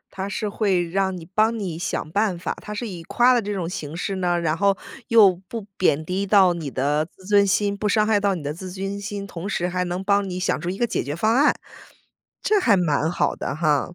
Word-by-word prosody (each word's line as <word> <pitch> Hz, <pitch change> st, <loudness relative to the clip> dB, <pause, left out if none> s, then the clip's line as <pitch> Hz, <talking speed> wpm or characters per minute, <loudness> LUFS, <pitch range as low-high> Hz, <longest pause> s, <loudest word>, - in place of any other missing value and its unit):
他 195 Hz, +1 st, -3 dB
是 210 Hz, +1 st, -3 dB
会 195 Hz, -4 st, 0 dB
让 190 Hz, 0 st, 0 dB
你 165 Hz, -, -9 dB
帮 215 Hz, +6 st, +1 dB
你 185 Hz, -7 st, -4 dB
想 165 Hz, -2 st, -3 dB
办 200 Hz, -1 st, +1 dB
法， 175 Hz, -, -3 dB
他 -, -, -9 dB
是 230 Hz, +2 st, -4 dB
以 175 Hz, -4 st, -7 dB
夸 245 Hz, +7 st, +4 dB
了 245 Hz, -, +3 dB
这 205 Hz, -1 st, -4 dB
种 185 Hz, -4 st, -2 dB
形 165 Hz, -4 st, -6 dB
式 195 Hz, +2 st, -2 dB
呢， 175 Hz, -2 st, +1 dB
然 160 Hz, -2 st, 0 dB
后 200 Hz, +2 st, +2 dB, 0.3 s
又 215 Hz, -5 st, +6 dB
不 230 Hz, +2 st, -5 dB
贬 155 Hz, -4 st, +1 dB
低 185 Hz, +4 st, -1 dB
到 190 Hz, -3 st, +5 dB
你 160 Hz, -4 st, -5 dB
的 145 Hz, +4 st, 0 dB
自 190 Hz, -, -18 dB
尊 200 Hz, 0 st, +4 dB
心 200 Hz, +1 st, +1 dB
不 210 Hz, +1 st, -1 dB
伤 215 Hz, 0 st, +3 dB
害 215 Hz, -1 st, +3 dB
到 200 Hz, -1 st, +1 dB
你 165 Hz, -, -6 dB
的 145 Hz, +1 st, -3 dB
自尊心， 195 Hz, +3 st, -5 dB
同 185 Hz, 0 st, -6 dB
时 175 Hz, -2 st, -1 dB
还 180 Hz, 0 st, -1 dB
能 180 Hz, +2 st, -3 dB
帮 200 Hz, 0 st, +2 dB
你 180 Hz, 0 st, -4 dB
想 185 Hz, -, -1 dB
出 175 Hz, -, -3 dB
一 190 Hz, -, -4 dB
个 240 Hz, -, +2 dB
解 230 Hz, -, -2 dB
决 145 Hz, +2 st, -4 dB
方 215 Hz, +6 st, +2 dB
案， 290 Hz, +3 st, +5 dB, 0.9 s
这 420 Hz, -1 st, +3 dB
还 225 Hz, -, +4 dB
蛮 160 Hz, -3 st, +1 dB
好 175 Hz, -, 0 dB
的 140 Hz, -, -4 dB
哈。 155 Hz, +1 st, +1 dB
190 Hz, 265 characters per minute, -23 LUFS, 175-205 Hz, 0.9 s, 又